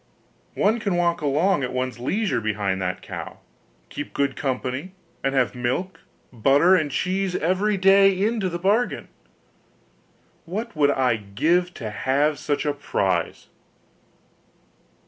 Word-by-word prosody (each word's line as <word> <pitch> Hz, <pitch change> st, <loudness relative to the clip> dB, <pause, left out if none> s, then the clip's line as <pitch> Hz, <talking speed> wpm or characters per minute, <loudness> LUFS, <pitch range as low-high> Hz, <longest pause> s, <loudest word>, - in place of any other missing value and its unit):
One 220 Hz, +4 st, +2 dB
can 200 Hz, -4 st, -1 dB
walk 175 Hz, -1 st, +1 dB
along 150 Hz, +2 st, +2 dB
at 125 Hz, -, -3 dB
one's 130 Hz, -1 st, -3 dB
leisure 195 Hz, -, -1 dB
behind 100 Hz, -3 st, -1 dB
that 90 Hz, 0 st, -3 dB
cow -, -, -7 dB, 0.5 s
keep 145 Hz, -, -7 dB
good 140 Hz, -1 st, 0 dB
company, 130 Hz, +5 st, -3 dB, 0.3 s
and 135 Hz, 0 st, 0 dB
have 125 Hz, -6 st, +2 dB
milk, 130 Hz, +10 st, -3 dB, 0.3 s
butter, 140 Hz, -, +4 dB
and 155 Hz, -5 st, +1 dB
cheese, 185 Hz, +5 st, -1 dB
every 195 Hz, +5 st, +1 dB
day, 195 Hz, 0 st, +5 dB
into 210 Hz, -1 st, 0 dB
the 175 Hz, -, -3 dB
bargain. 205 Hz, +7 st, 0 dB, 1.4 s
What 215 Hz, +6 st, -5 dB
would 145 Hz, -2 st, +3 dB
I 130 Hz, -4 st, +2 dB
give 160 Hz, -, 0 dB
to 110 Hz, -6 st, -5 dB
have 140 Hz, +6 st, 0 dB
such 145 Hz, 0 st, -2 dB
a 145 Hz, -, +1 dB
prize! -, -, -2 dB
150 Hz, 130 wpm, -23 LUFS, 130-190 Hz, 1.4 s, day